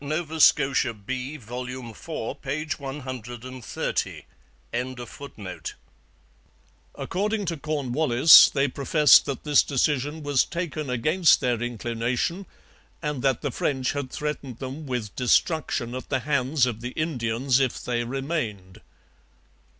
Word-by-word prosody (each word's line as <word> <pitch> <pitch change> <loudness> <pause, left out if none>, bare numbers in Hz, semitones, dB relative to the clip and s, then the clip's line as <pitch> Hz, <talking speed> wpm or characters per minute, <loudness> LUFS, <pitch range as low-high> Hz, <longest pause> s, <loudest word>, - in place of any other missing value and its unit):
Nova 155 +2 -3
Scotia 135 -6 +4
B, 130 +7 -5
vol. 125 0 -6
iv, 125 -4 -8 0.4
p. 145 +3 -3
130.] 130 -3 -5 2.7
According 210 +2 -2
to 170 -1 -2
Cornwallis, 145 -1 +6
they 140 0 +1
professed 145 +2 +5
that 140 - -4
this 150 -2 +5
decision 145 +2 0
was 145 -2 +3
taken 160 -4 -4
against 155 +8 +4
their 120 -2 0
inclination, 120 - -2 0.6
and 150 -4 -2
that 135 -2 +1
the - - -2
French 130 -3 -1
had 140 -2 -4
threatened 145 -5 -4
them 135 +4 -7
with 120 -5 -4
destruction 125 -1 +1
at 130 - -6
the 130 -2 0
hands 140 0 +1
of 115 -3 -4
the 125 +1 -5
Indians 130 -4 0
if 130 -3 0
they 120 -1 -1
remained. 120 - -4
135 Hz, 115 wpm, -25 LUFS, 125-150 Hz, 2.7 s, Cornwallis